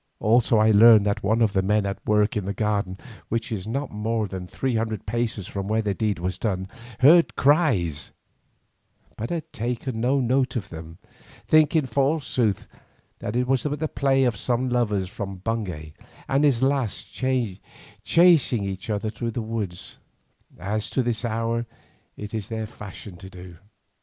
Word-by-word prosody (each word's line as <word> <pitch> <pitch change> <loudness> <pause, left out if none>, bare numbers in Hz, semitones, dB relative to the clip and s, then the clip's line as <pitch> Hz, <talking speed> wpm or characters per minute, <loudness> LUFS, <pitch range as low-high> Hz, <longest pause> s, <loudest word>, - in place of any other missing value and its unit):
Also 115 +1 +3
I 110 +1 +5
learned 110 0 +7
that 100 -1 0
one 110 +3 +2
of 105 -3 +1
the 95 - +2
men 105 +2 +1
at 100 -1 -4
work 105 0 +2
in 105 -3 -2
the 100 0 -3
garden, 100 -3 -1 0.3
which 115 +2 -2
is 100 -2 -4
not 135 +5 -3
more 110 +1 -1
than 95 -2 -6
three 130 +5 -2
hundred 110 -1 -2
paces 110 -3 -2
from 100 -1 -5
where 110 +1 +1
the 100 -2 0
deed 105 +1 -1
was 90 +2 -3
done, 95 -4 -2 0.3
heard 165 +6 +6
cries, 130 - +2 1.0
but 115 - -5
had 165 -3 -5
taken 120 0 -3
no 130 +4 +2
note 130 +1 +1
of 100 -6 -3
them, 80 0 -9 0.5
thinking 155 -1 +4
forsooth 130 - 0 0.5
that 105 - -4
it 125 +1 +1
was 130 -1 +1
but 145 +1 -3
the 155 - -1
play 135 -2 +1
of 120 -3 +1
some 125 +4 0
lover 110 -6 0
from 95 +1 -6
Bungay 90 -7 -4 0.3
and 140 +2 +2
his 130 -4 +2
lass 135 -5 0
chasing 130 - +1
each 95 +1 -5
other 105 0 -1
through 115 +2 -4
the 115 0 -3
woods, 110 -5 -5 0.6
as 105 +3 -3
to 130 - 0
this 120 -1 -2
hour 115 0 -1 0.5
it 105 +1 -7
is 110 -2 -3
their 110 -1 -4
fashion 105 -3 -10
to 95 +1 -11
do. 90 -2 -12
110 Hz, 170 wpm, -24 LUFS, 100-125 Hz, 1.0 s, learned